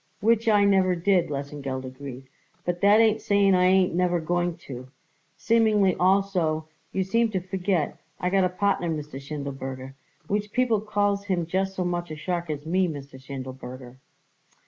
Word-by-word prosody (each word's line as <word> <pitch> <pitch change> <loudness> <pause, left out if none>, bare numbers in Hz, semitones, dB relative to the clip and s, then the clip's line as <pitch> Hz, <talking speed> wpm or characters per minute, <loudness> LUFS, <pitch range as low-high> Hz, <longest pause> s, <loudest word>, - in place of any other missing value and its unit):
"Which 230 +2 +3
I 205 -2 +5
never 190 -2 +3
did," 180 0 +2
Lesengeld 140 -2 -4
agreed; 130 0 -8 0.4
"but 175 0 -2
that 205 +2 +6
ain't 220 -1 +4
saying 200 -2 +3
I 180 0 +4
ain't 185 -1 +4
never 175 0 +1
going 175 +1 -1
to. 130 -1 -8 0.5
Seemingly, 215 -4 +3
also, 180 -5 +1 0.2
you 190 - 0
seem 230 +5 +2
to 195 -3 -1
forget 185 -2 -1 0.2
I 180 - -1
got 195 -1 +3
a 180 - +2
partner, 185 -1 0
Mr. 150 -3 -5
Schindelberger, 135 -2 -6 0.3
which 205 +3 -2
people 245 -5 +2
calls 205 -1 0
him 180 -4 0
just 190 +3 -1
so 185 - -1
much 175 -1 -2
a 155 - -5
shark 170 +2 -3
as 150 -1 -4
me, 185 +3 +2
Mr. 140 -4 -8
Schindelberger." 130 -2 -8
180 Hz, 165 wpm, -26 LUFS, 145-200 Hz, 0.5 s, that